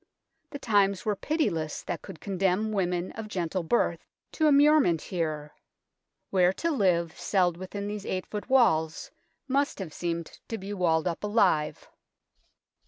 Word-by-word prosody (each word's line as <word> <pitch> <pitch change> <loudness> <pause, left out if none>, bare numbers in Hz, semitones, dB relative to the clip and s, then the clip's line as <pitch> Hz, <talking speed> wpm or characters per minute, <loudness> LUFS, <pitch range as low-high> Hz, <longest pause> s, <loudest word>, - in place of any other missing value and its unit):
The 285 - -6
times 205 -4 +2
were 210 -1 +1
pitiless 190 - -1
that 175 - -4
could 160 - -10
condemn 195 +3 0
women 180 -3 -1
of 220 -1 -7
gentle 180 -2 -2
birth 205 +9 0 0.3
to 315 - +2
immure 300 +1 +6
ment 170 - +2
here, 155 -4 -3 0.8
where 180 -2 +4
to 335 +10 -1
live 175 - +1
celled 180 -4 +2
within 190 +3 -6
these 210 0 -4
THE - - -8
BELL 185 - -1
TOWER - - -27
73 210 - -2
8 - - -13
ft. - - -24
walls 160 -12 +2 0.4
must 280 +2 +1
have 180 -6 -6
seemed 170 -1 -4
to 225 - -4
be 195 +1 -6
walled 170 -4 +1
up 170 +2 -3
alive. 190 -8 +1
190 Hz, 170 wpm, -28 LUFS, 170-215 Hz, 0.8 s, immure